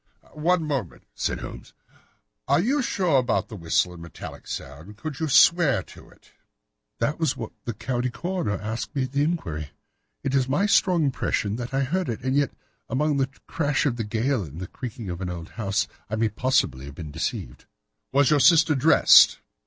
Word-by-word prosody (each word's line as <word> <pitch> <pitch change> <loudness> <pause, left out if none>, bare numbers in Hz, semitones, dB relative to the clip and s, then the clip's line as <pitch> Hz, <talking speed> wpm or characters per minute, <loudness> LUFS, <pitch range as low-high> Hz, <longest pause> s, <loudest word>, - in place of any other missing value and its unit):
"One 165 +3 +1
moment," 135 - -3
said - - -2
Holmes, - - -9 0.7
"are - - +4
you 265 - +1
sure 180 - +2
about 125 - 0
this 110 -4 -8
whistle 85 +2 +1
and 85 - -11
metallic 85 -1 -10
sound? 80 +10 -8
Could 150 +3 -6
you 160 - -1
swear 145 - +5
to - - -15
it?" - - -23 0.7
"That 150 +3 -1
was 160 -5 0
what 115 -2 -6
the 120 - -4
county 125 +2 -2
coroner 170 - -3
asked 110 +6 -5
me 135 - +1
at 130 - -5
the 140 +1 +1
inquiry. 85 - -2 0.5
It 135 - -1
is 135 -1 +2
my 170 +9 +2
strong 185 -4 +3
impression 110 -6 -1
that 120 +1 -5
I 135 0 +1
heard 175 +5 -1
it, 115 - -4
and 130 +1 0
yet, 145 -1 +2 0.4
among 150 +2 +1
the 135 -1 +1 0.2
crash 145 -3 0
of 125 -5 0
the 115 - -2
gale 115 +4 0
and 80 -2 -8
the 90 - -4
creaking 115 +2 -7
of 85 +1 -6
an 90 - -3
old 85 -2 -6
house, 100 -2 -1 0.2
I 110 - -2
may 110 0 +1
possibly 105 - 0
have 70 0 -10
been 80 -4 -7
deceived." 75 -5 -4 0.5
"Was 140 0 +3
your 150 - +4
sister 160 +1 +6
dressed?" 145 +3 +6
130 Hz, 190 wpm, -25 LUFS, 100-150 Hz, 0.7 s, sister